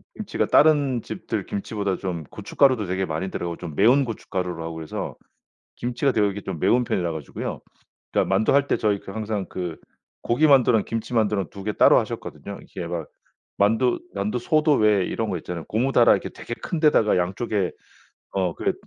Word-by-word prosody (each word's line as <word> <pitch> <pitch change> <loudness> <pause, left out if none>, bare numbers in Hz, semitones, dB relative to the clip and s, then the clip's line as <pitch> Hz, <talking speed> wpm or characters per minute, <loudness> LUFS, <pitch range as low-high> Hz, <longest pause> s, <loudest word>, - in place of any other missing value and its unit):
김치가 - - -2
다른 145 -5 +4
집들 - - -4
김치보다 100 -1 -3
좀 90 -4 -4
고춧가루도 130 - +1
되게 95 +2 -1
많이 85 +4 -3
들어가고 85 -1 -4
좀 85 -4 -7
매운 125 - +5
고춧가루로 90 -6 -4
하고 80 0 -5
그래서 80 -1 -5 0.6
김치가 125 +3 0
되게 105 -3 +2
이렇게 100 0 -2
좀 90 -5 -5
매운 120 +8 +3
편이라 85 -5 -1
가지고요. 80 -2 -6 0.5
그러니까 - - +2
만두 95 +3 +2
할 140 0 +4
때 - - +2
저희 105 -2 0
그 - - -10
항상 110 -3 -3
그 90 -3 -5 0.5
고기만두랑 125 -4 +4
김치만두랑 110 -5 -1
2 100 - -9
개 105 - -1
따로 - - +6
하셨거든요. 100 0 -5
이게 90 -3 -7
막 85 -2 -4 0.5
만두 115 +5 +2 0.2
만두소도 125 +9 +1
왜 105 -5 +3
이런 110 -2 -2
거 90 - -2
있잖아요. 85 +1 -6
고무 125 +5 0
다라 - - +6
이렇게 - - 0
되게 - - -10
큰 170 - -2
데다가 130 - +4
양쪽에 95 +2 -1 0.6
어 90 -3 0
그 - - 0
105 Hz, 390 characters per minute, -24 LUFS, 90-120 Hz, 0.6 s, 따로